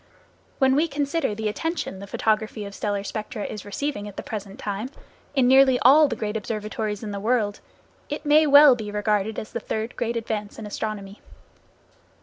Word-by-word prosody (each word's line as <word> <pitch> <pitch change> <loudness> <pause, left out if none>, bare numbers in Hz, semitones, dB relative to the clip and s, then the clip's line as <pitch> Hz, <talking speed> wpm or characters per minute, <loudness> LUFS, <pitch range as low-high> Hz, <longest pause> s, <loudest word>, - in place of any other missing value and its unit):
When 265 -1 +4
we 310 +4 +3
consider 285 -4 -1
the 220 0 -2
attention 325 - -3
the 200 - -8
photography 215 +1 -1
of 200 - -8
stellar 205 -1 -2
spectra 215 +1 -5
is 210 - -6
receiving 205 +1 -4
at 205 - -11
the - - -5
present 205 -1 -6
time, 215 -1 -4 0.5
in 260 -3 +4
nearly 265 0 +6
all 295 +5 +7
the 240 - -3
great 215 0 -3
observatories 215 0 -3
in 210 - -4
the 200 - -4
world, 210 -1 0 0.5
it 295 +1 -5
may 300 +1 +5
well 285 -1 +8
be 215 -3 -6
regarded 210 0 0
as 215 - -6
the - - -3
third 220 +1 -4
great 235 0 -2
advance 215 -2 -4
in 220 - -7
astronomy. 205 -1 -5
220 Hz, 180 wpm, -24 LUFS, 210-265 Hz, 0.5 s, well